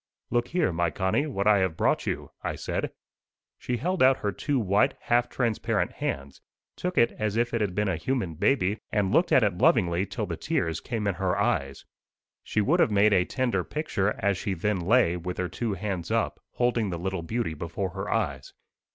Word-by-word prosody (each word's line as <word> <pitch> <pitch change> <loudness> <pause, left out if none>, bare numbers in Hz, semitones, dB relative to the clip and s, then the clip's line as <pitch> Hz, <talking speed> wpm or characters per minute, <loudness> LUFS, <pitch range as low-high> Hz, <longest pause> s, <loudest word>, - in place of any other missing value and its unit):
"Look 120 0 +1
here, 170 - +1
my 85 0 +1
Connie, 95 - 0
what 100 -9 -2
I 105 -1 +5
have 95 -4 0
brought - - +1
you," - - -3
I - - -3
said. - - -3 0.7
She 125 - -2
held 180 +7 -1
out 130 +1 +6
her 100 - -2
two 145 +8 -1
white, 100 -3 +2
half 120 0 +1
transparent 115 -4 0
hands, 70 0 -4 0.3
took 180 0 -3
it 115 - +5
as 110 0 -1
if 120 +1 +1
it 115 - 0
had 100 -4 -1
been 105 +1 +1
a 90 -4 0
human 115 -3 -2
baby 100 - +1
and 100 -3 +1
looked 175 - +3
at 130 - +6
it 100 -4 0
lovingly 90 -4 +3
till 95 - -3
the - - -4
tears 80 -1 -1
came 115 -4 -3
in 100 - +1
her 95 0 +1
eyes. 70 -9 -1 0.6
She 105 - 0
would 155 - +2
have - - +5
made 105 0 +4
a 90 -2 +4
tender 120 -7 0
picture, 105 - -1
as 100 -1 0
she 100 - -2
then 100 +3 0
lay, 90 -1 +3
with 90 +1 -5
her 90 - -1
two 115 -4 -2
hands 95 -3 -4
up, - - 0
holding 120 -4 +1
the 85 - -3
little 95 +1 -3
beauty 110 0 -2
before 85 +4 -4
her 95 +1 -5
eyes. - - -2
100 Hz, 205 wpm, -27 LUFS, 90-120 Hz, 0.7 s, out